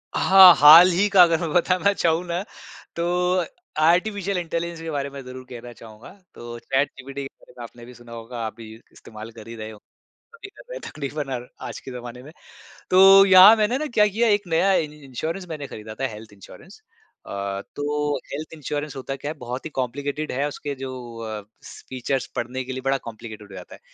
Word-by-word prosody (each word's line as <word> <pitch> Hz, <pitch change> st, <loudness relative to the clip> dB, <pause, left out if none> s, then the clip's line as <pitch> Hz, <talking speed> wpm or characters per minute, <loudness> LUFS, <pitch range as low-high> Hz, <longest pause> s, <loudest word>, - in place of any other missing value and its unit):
हाँ 190 Hz, -2 st, +8 dB
हाल 155 Hz, +5 st, +9 dB
ही 185 Hz, +4 st, +2 dB
का 195 Hz, -2 st, +6 dB
अगर 165 Hz, -2 st, +2 dB
मैं 165 Hz, -, -2 dB
बताना 180 Hz, +2 st, +2 dB
चाहूँ 170 Hz, -2 st, 0 dB
न 175 Hz, +2 st, -3 dB, 0.5 s
तो 180 Hz, +1 st, 0 dB, 0.4 s
आर्टिफिशियल 195 Hz, +3 st, +1 dB
इंटेलिजेंस 170 Hz, -1 st, -4 dB
के 165 Hz, -, -6 dB
बारे 140 Hz, -1 st, -3 dB
में 140 Hz, 0 st, -9 dB
ज़रूर 130 Hz, 0 st, -10 dB
कहना 120 Hz, -1 st, -9 dB
चाहूँगा। 110 Hz, 0 st, -14 dB, 0.3 s
तो 120 Hz, 0 st, -9 dB
चैटजीपीटी 135 Hz, +1 st, -3 dB
के -, -, -5 dB
बारे -, -, -20 dB
में 120 Hz, -, -8 dB
आपने 120 Hz, 0 st, -12 dB
भी 125 Hz, -, -13 dB
सुना 120 Hz, -1 st, -16 dB
होगा 115 Hz, +1 st, -8 dB
आप 110 Hz, -, -6 dB
भी 110 Hz, -1 st, -11 dB, 0.2 s
इस्तेमाल 110 Hz, +1 st, -12 dB
कर 110 Hz, -1 st, -13 dB
ही 115 Hz, -, -8 dB
रहे 110 Hz, -1 st, -7 dB
होंगे, 105 Hz, -, -16 dB, 0.5 s
सभी 420 Hz, -, -11 dB
कर 405 Hz, -, -16 dB
रहे -, -, -6 dB
हैं -, -, -7 dB
तकरीबन 145 Hz, -1 st, -5 dB
और 125 Hz, 0 st, -7 dB, 0.2 s
आज -, -, -7 dB
के -, -, -10 dB
ज़माने 125 Hz, 0 st, -9 dB
में। 145 Hz, -, -12 dB, 0.6 s
तो 195 Hz, +1 st, +7 dB
यहाँ 190 Hz, +3 st, +9 dB
मैंने 220 Hz, +3 st, 0 dB
न 305 Hz, +2 st, -3 dB
क्या 210 Hz, -2 st, +4 dB
किया 225 Hz, +4 st, 0 dB
एक 205 Hz, -1 st, +2 dB
नया 175 Hz, +4 st, +2 dB
इ 165 Hz, -, +2 dB
इंश्योरेंस 150 Hz, +6 st, -6 dB
मैंने 150 Hz, -3 st, -6 dB
खरीदा 110 Hz, -2 st, -9 dB
था 135 Hz, -, 0 dB
हेल्थ 110 Hz, -2 st, -11 dB
इंश्योरेंस। 100 Hz, -2 st, -15 dB, 0.5 s
अ 100 Hz, 0 st, -4 dB
तो 145 Hz, 0 st, -2 dB, 0.2 s
हेल्थ 155 Hz, +3 st, -6 dB
इंश्योरेंस 150 Hz, -1 st, -5 dB
होता 135 Hz, 0 st, -5 dB
क्या 145 Hz, +2 st, -6 dB
है 155 Hz, -, -10 dB
बहुत 125 Hz, +1 st, -7 dB
ही -, -, -4 dB
कॉम्प्लिकेटेड 145 Hz, +4 st, -3 dB
है 140 Hz, +3 st, -1 dB
उसके 145 Hz, -1 st, -6 dB
जो 135 Hz, -1 st, -5 dB, 0.4 s
अ 110 Hz, -1 st, -5 dB, 0.5 s
फीचर्स 130 Hz, +1 st, -3 dB
पढ़ने 125 Hz, +2 st, -4 dB
के 130 Hz, -, -8 dB
लिए 130 Hz, -, -6 dB
बड़ा 135 Hz, 0 st, +1 dB
कॉम्प्लिकेटेड 110 Hz, -2 st, -10 dB
हो -, -, -10 dB
जाता 90 Hz, -1 st, -11 dB
है -, -, -19 dB
140 Hz, 205 wpm, -23 LUFS, 120-175 Hz, 0.6 s, हाल